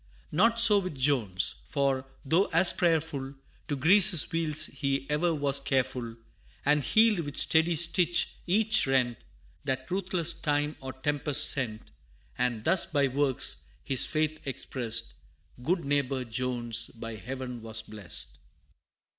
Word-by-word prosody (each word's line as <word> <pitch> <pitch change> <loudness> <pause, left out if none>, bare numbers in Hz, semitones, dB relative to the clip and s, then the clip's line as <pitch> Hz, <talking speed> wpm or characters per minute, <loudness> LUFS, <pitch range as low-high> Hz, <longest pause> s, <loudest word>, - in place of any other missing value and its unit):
Not 230 +8 +2
so 220 -3 +9
with 185 -7 -7
Jones 110 - -1
for, 135 -1 -2 0.2
though 165 +8 +2
as 170 +2 +3
prayerful, 155 -5 -2 0.3
To 145 - -2
grease 185 +8 +6
his 175 -5 +2
wheels 160 -2 0
he 140 0 -3
e'er 165 +4 0
was 140 -1 +1
careful, 130 -3 -3 0.5
And 150 0 +2
healed, 220 +1 +3
with 145 -4 +2
ready 165 +1 +2
stitch, 170 +2 +2 0.2
each 215 0 +3
rent 125 -3 0 0.4
That 130 -1 -4
ruthless 180 -3 -1
time 150 -2 -2
or 130 0 -8
tempest 145 +1 +2
sent; 115 -6 -5 0.4
And 120 -3 -2
thus, 185 - +4
by 140 -3 0
works, 135 -1 +1 0.2
his 135 -2 +3
faith 155 0 -2
expressed, 115 - -2 0.5
Good 170 +5 -2
neighbor 140 -2 -1
Jones 120 -1 -1
by 115 -1 -9
Heaven 125 +2 -8
was 110 0 -3
blessed. 100 - -4
140 Hz, 135 wpm, -27 LUFS, 125-165 Hz, 0.5 s, so